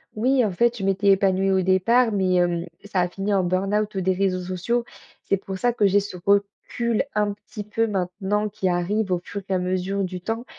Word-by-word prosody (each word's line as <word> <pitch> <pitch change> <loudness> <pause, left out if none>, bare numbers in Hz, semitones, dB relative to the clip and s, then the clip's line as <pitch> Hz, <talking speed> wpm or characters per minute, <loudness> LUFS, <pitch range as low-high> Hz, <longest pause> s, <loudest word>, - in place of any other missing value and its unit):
Oui, 250 +3 +2
en 205 - -1
fait, 235 +6 +1
je 200 - -5
m'étais 195 +1 +1
épanouie 195 -1 +3
au 190 -1 +3
départ, 220 +6 +3
mais 190 -2 +1
hem, 175 -1 +1 0.2
ça 200 -2 -1
a 180 - +1
fini 195 +3 -3
en 195 -2 +2
burn-out 195 +3 0
des 190 0 +1
réseaux 185 -1 0
sociaux. 185 +7 -2 0.4
C'est 195 - +1
pour 190 0 -6
ça 245 +5 +1
que 205 -3 +3
j'ai 200 +1 +4
ce 200 -2 -6
recul, 205 +3 0
un 210 -1 +1
petit 210 +1 -9
peu, 225 +2 -1
maintenant 195 +2 -1
qui 195 -2 -2
arrive 185 +3 0
au 180 - +2
fur 200 - -6
et - - 0
à - - +3
mesure 185 +2 -1
du 185 -1 -5
temps. 225 +5 -3
195 Hz, 215 wpm, -23 LUFS, 185-210 Hz, 0.4 s, j'ai